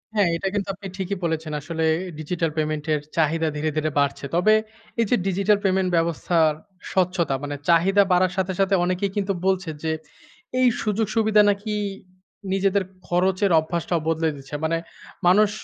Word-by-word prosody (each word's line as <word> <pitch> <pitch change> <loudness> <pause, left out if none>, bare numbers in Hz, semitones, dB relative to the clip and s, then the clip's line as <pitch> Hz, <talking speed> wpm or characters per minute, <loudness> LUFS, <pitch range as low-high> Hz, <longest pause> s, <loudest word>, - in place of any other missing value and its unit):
হ্যাঁ, 205 -4 +3
এটা 195 - -3
কিন্তু 200 -1 -1
আপনি 195 0 -8
ঠিকই 195 0 -3
বলেছেন। 160 -1 -2
আসলে 160 +2 -3 0.4
ডিজিটাল 165 +1 -1
পেমেন্ট 155 0 -1
এর 150 - 0 0.2
চাহিদা 160 +1 +2
ধীরে, 150 +1 -1
ধীরে 155 0 +1
বাড়ছে। 140 0 0
তবে 215 +5 +4 0.5
এই - - +3
যে - - +4
ডিজিটাল 200 +2 +2
পেমেন্ট 190 -1 +2
ব্যবস্থার 165 -1 +2 0.4
স্বচ্ছতা 175 -6 +1
মানে 145 0 -3
চাহিদা 190 +4 +5
বাড়ার 180 0 +4
সাথে, 190 0 0
সাথে 195 0 +3
অনেকেই 185 +2 0
কিন্তু 195 0 0
বলছে 190 -2 +1
যে 160 - 0 0.7
এই 255 - +5
সুযোগ-সুবিধা 215 0 +2
নাকি 205 +2 -1 0.8
নিজেদের 195 0 +2 0.2
খরচের 185 +2 +2
অভ্যাসটাও 170 +1 -2
বদলে 160 0 +1
দিচ্ছে। 135 +2 -8
মানে 165 +1 +1 0.5
মানুষ 205 +3 +5
180 Hz, 155 wpm, -23 LUFS, 160-195 Hz, 0.8 s, চাহিদা